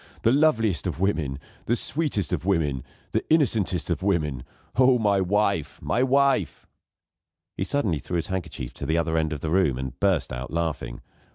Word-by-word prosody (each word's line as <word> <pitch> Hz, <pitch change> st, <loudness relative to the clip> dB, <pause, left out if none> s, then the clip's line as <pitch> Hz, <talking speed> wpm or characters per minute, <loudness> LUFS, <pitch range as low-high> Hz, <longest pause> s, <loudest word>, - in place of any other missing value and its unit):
The 115 Hz, -, +4 dB
loveliest 115 Hz, -, +2 dB
of -, -, -4 dB
women, 80 Hz, -9 st, 0 dB, 0.3 s
the 120 Hz, -, +2 dB
sweetest 125 Hz, -, +1 dB
of -, -, -1 dB
women, 80 Hz, -9 st, 0 dB, 0.3 s
the -, -, 0 dB
innocentest 105 Hz, -, +2 dB
of 80 Hz, -, -1 dB
women. 80 Hz, -10 st, 0 dB, 0.3 s
Oh, 130 Hz, +1 st, +5 dB
my 100 Hz, -4 st, +2 dB
wife! 100 Hz, -4 st, 0 dB
my 120 Hz, -, 0 dB
wife!" 135 Hz, +1 st, +2 dB, 0.9 s
He -, -, -2 dB
suddenly 105 Hz, -, 0 dB
threw 90 Hz, -, -5 dB
his 85 Hz, -, 0 dB
handkerchief 90 Hz, -9 st, -5 dB
to 70 Hz, -, -6 dB
the 80 Hz, +2 st, +1 dB
other 80 Hz, -1 st, 0 dB
end 80 Hz, -1 st, 0 dB
of 75 Hz, -3 st, -4 dB
the 80 Hz, -, -3 dB
room, 85 Hz, -8 st, +2 dB
and 65 Hz, 0 st, -6 dB
burst 95 Hz, -8 st, +1 dB
out 65 Hz, +2 st, -5 dB
laughing. 80 Hz, -7 st, -3 dB
90 Hz, 175 wpm, -25 LUFS, 75-110 Hz, 0.9 s, Oh